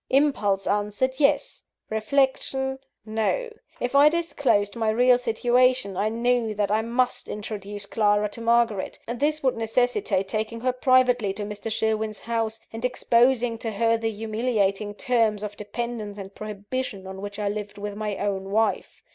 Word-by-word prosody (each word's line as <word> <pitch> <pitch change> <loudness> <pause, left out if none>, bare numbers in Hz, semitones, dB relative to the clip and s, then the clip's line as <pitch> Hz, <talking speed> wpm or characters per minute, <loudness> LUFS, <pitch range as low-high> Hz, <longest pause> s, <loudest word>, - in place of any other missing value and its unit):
Impulse 210 -9 +2
answered, 210 +6 0
yes 280 -2 +2 0.3
reflection, 265 +3 +1 0.3
no. 225 - -1 0.3
If 245 - -2
I 285 +2 +7
disclosed 285 -11 0
my 225 -2 0
real 245 +3 +4
situation, 245 -2 +2
I 205 +3 +1
knew 235 -1 0
that 205 -1 0
I 215 +1 +3
must 240 +3 0
introduce 205 -1 -6
Clara 210 0 +2
to 230 - -8
Margaret. 230 -3 +1
This 290 +6 -1
would 260 -2 +2
necessitate 225 - 0
taking 220 +2 -3
her 255 0 +1
privately 250 -5 +3
to 210 - -5
Mr. 210 +2 -5
Sherwin's 220 -1 -1
house, 225 -1 -2
and 225 +1 -6
exposing 245 -1 +2
to 230 - -3
her 230 +2 +2
the 225 0 -1
humiliating 215 -2 -1
terms 220 -3 +1
of 205 -1 -5
dependence 215 -1 -5
and 195 -1 -8
prohibition 210 0 -5
on 190 0 -7
which 205 0 -6
I 210 -1 -2
lived 205 0 -4
with 205 0 -5
my 210 -2 -3
own 195 -1 -2
wife. 220 +2 0
225 Hz, 155 wpm, -25 LUFS, 205-245 Hz, 0.3 s, I